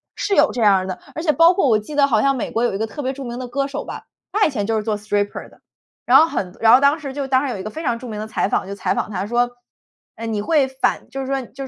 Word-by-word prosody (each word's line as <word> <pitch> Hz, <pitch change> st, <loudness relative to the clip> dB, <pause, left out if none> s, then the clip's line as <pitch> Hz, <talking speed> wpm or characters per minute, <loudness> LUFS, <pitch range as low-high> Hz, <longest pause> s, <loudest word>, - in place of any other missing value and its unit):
是 400 Hz, -, -1 dB
有 295 Hz, 0 st, +4 dB
这 240 Hz, -, -3 dB
样 205 Hz, -3 st, +6 dB
儿 185 Hz, -, -2 dB
的。 185 Hz, -1 st, -5 dB, 0.2 s
而 315 Hz, -, -4 dB
且 320 Hz, -, +3 dB
包 330 Hz, +3 st, +5 dB
括 370 Hz, -, +2 dB
我 220 Hz, -4 st, +4 dB
记 215 Hz, +8 st, -9 dB
得 285 Hz, -1 st, +5 dB
好 225 Hz, -6 st, +2 dB
像 275 Hz, +2 st, +2 dB
美 250 Hz, -, -4 dB
国 230 Hz, -, 0 dB
有 240 Hz, -, 0 dB
一 -, -, -1 dB
个 220 Hz, -, -1 dB
特 290 Hz, +7 st, -7 dB
别 260 Hz, -1 st, -1 dB
著 275 Hz, 0 st, -8 dB
名 240 Hz, -1 st, -6 dB
的 255 Hz, -, -5 dB
歌 275 Hz, +3 st, -1 dB
手 280 Hz, +1 st, -5 dB
吧， -, -, -7 dB, 0.3 s
他 420 Hz, +1 st, +3 dB
以 -, -, +1 dB
前 205 Hz, -6 st, -2 dB
就 225 Hz, -1 st, +1 dB
是 215 Hz, -, -2 dB
做 215 Hz, -1 st, -1 dB
stripper 205 Hz, -1 st, -3 dB
的。 -, -, -22 dB, 0.5 s
然 -, -, +7 dB
后 320 Hz, -, +6 dB
很 185 Hz, -, -4 dB
然 225 Hz, +1 st, +7 dB
后 -, -, +5 dB
当 280 Hz, +3 st, +3 dB
时 285 Hz, -3 st, -6 dB
就 280 Hz, +1 st, -4 dB
当 260 Hz, 0 st, +2 dB
时 -, -, -2 dB
有 -, -, -5 dB
一 190 Hz, -, -6 dB
个 215 Hz, -, -6 dB
非 320 Hz, -, -7 dB
常 240 Hz, -5 st, 0 dB
著 250 Hz, +2 st, -9 dB
名 215 Hz, -2 st, -6 dB
的 215 Hz, -, -5 dB
采 220 Hz, -, -1 dB
访 -, -, -1 dB
就 200 Hz, -, -5 dB
采 -, -, -1 dB
访 -, -, -2 dB
他 195 Hz, 0 st, -3 dB
说， 240 Hz, +2 st, +1 dB, 0.6 s
呃， 230 Hz, -, -7 dB
你 220 Hz, -2 st, -2 dB
会 285 Hz, +3 st, +2 dB
反 265 Hz, 0 st, -1 dB
就 270 Hz, -, -5 dB
是 265 Hz, -, -5 dB
说 270 Hz, 0 st, 0 dB
就 270 Hz, +1 st, -8 dB
245 Hz, 390 characters per minute, -20 LUFS, 215-280 Hz, 0.6 s, 然